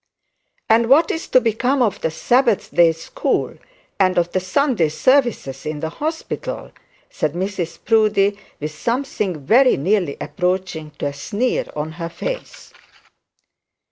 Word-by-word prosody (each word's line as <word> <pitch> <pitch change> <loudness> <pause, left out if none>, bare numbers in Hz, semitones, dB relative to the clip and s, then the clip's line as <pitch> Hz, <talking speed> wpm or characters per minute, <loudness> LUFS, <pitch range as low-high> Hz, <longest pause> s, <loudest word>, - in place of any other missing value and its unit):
'And 230 +1 +3
what 310 +5 +5
is 325 - -4
to 255 - +5
become 250 +3 +1
of 215 -5 -1
the 160 - 0
Sabbath 235 +6 +1
day 170 -1 +6
school, 330 - -2 0.4
and 185 -2 +3
of 175 0 +1
the 185 - +1
Sunday 185 - +1
services 240 - +1
in 150 -1 -4
the 160 +1 -3
hospital?' 315 - -5 0.4
said 150 -1 -1
Mrs 175 -2 -3
Proudie, 210 -3 +3 0.2
with 150 +1 -4
something 205 - -2
very 255 - +5
nearly 180 -1 0
approaching 180 -4 -2
to - - -4
a 140 - -2
sneer 215 - -1
on 150 +1 -3
her 165 +1 -6
face. - - -6
195 Hz, 140 wpm, -20 LUFS, 165-250 Hz, 0.4 s, day